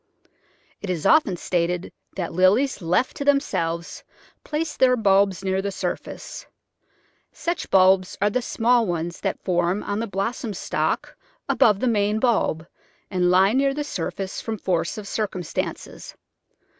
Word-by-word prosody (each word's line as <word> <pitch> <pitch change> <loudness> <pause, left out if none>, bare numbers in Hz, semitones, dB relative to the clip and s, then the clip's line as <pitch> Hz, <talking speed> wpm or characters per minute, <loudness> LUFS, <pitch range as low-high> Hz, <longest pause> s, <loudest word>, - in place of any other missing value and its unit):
It 200 - -6
is 175 -4 -2
often 255 - +4
stated 175 +1 -1 0.2
that 175 -3 -4
Lilies 195 +11 +3
left 180 +9 +1
to - - -3
themselves 170 - 0 0.4
place 310 0 -3
their 255 -1 +4
bulbs 195 -4 +2
near 190 0 0
the 200 0 -3
surface. - - -5 0.8
Such 345 0 -3
bulbs 185 0 +4
are 205 +1 +2
die 255 - +1
small 240 -1 +2
ones 170 -1 -3
that - - -3
form 180 +2 0
on 205 - -2
the 230 - -2
blossom 205 +3 -3
stalk - - -2 0.3
above 210 -3 +4
the 255 - +1
main 210 -2 +1
bulb, 220 -9 +1 0.5
and 180 -2 +2
lie 190 +3 +4
near 275 +1 +2
the 295 - -2
surface 195 - -4
from 225 -1 -4
force 170 -3 -1
of 210 -2 -7
circum 200 -5 -3
stances. 150 - -5
195 Hz, 145 wpm, -23 LUFS, 180-235 Hz, 0.8 s, often